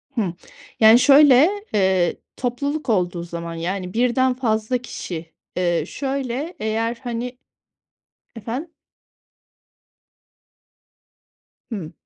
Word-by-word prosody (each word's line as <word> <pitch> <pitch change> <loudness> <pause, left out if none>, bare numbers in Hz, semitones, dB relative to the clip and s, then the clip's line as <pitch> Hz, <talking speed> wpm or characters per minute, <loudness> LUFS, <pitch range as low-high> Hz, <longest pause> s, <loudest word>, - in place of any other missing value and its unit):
Hı. 195 -7 -1 0.5
Yani, 220 +2 +8
şöyle, 285 +2 +7 0.2
eee, 190 -3 +2 0.2
topluluk 275 +3 -3
olduğu 180 -4 0
zaman, 170 -1 -6
yani, 180 +2 -4
1'den 250 +2 +2
fazla 230 -1 0
kişi. 170 -9 -7 0.2
Eee, 175 -3 +1
şöyle, 275 +3 -3
eğer, 225 +2 -1
hani 245 +1 -4 1.0
Efendim? 245 +9 -5 3.0
Hı. 175 -8 -5
230 Hz, 85 wpm, -22 LUFS, 180-255 Hz, 3.0 s, Yani